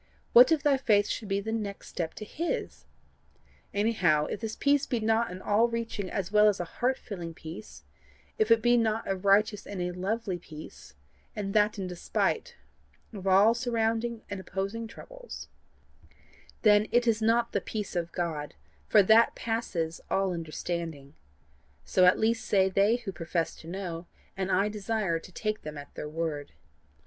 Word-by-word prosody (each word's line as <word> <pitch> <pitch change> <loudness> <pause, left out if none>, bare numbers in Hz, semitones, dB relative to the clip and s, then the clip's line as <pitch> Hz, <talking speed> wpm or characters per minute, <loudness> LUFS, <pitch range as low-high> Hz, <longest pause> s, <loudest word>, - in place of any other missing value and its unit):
What 250 +5 +9
if 310 -3 +2
thy 285 -3 +4
faith 210 -6 +3
should 215 - -4
be 195 0 0
the 220 +2 -4
next 210 -3 -4
step 165 -2 -4
to 215 - -7
his? 335 +10 -4 0.9
Anyhow, 190 -8 +2
if - - -4
this 225 -1 -4
peace 285 0 +2
be 240 - 0
not 225 +1 +1
an 185 +1 -8
all 215 +3 +3
reaching 230 -4 -3
as 195 -1 -3
well 210 0 +6
as 205 - -1
a - - 0
heart 250 +9 -1
filling 170 -6 -7
peace; 170 +8 -10 0.6
if 215 - +2
it 230 -1 +5
be 240 0 +5
not 225 -1 0
a 195 - 0
righteous 200 +2 +2
and 200 - -6
a 180 0 -1
lovely 190 +1 -2
peace, 155 - -12 0.4
and 195 -2 -3
that 210 0 +3
in 195 - -3
despite 180 - -1 0.6
of 195 -2 -6
all 195 +4 +6
surrounding 230 -1 -1
and 200 - -5
opposing 195 +5 -4
troubles, - - -10 1.1
then 210 -1 +5
it 240 0 +3
is 225 -2 +2
not 230 +1 +2
the - - 0
peace 210 -3 -5
of 170 -1 -2
God, 160 -4 -3 0.3
for 210 - +6
that 220 +4 +5
passeth 180 -8 -2
all 195 -1 +1
understanding: 165 -3 -5 0.7
so 185 - +4
at 180 - +6
least 225 +1 0
say 190 -2 +3
they 200 +4 +3
who 230 -5 -5
profess 165 -1 -2
to 160 - -13
know, 175 -2 -5 0.3
and 190 0 -2
I 195 +3 +3
desire 210 -4 -1
to 185 - -14
take 215 +3 -3
them 150 -1 -7
at 145 0 -10
their 150 - -6
word. 155 -2 -4
205 Hz, 175 wpm, -29 LUFS, 180-225 Hz, 1.1 s, What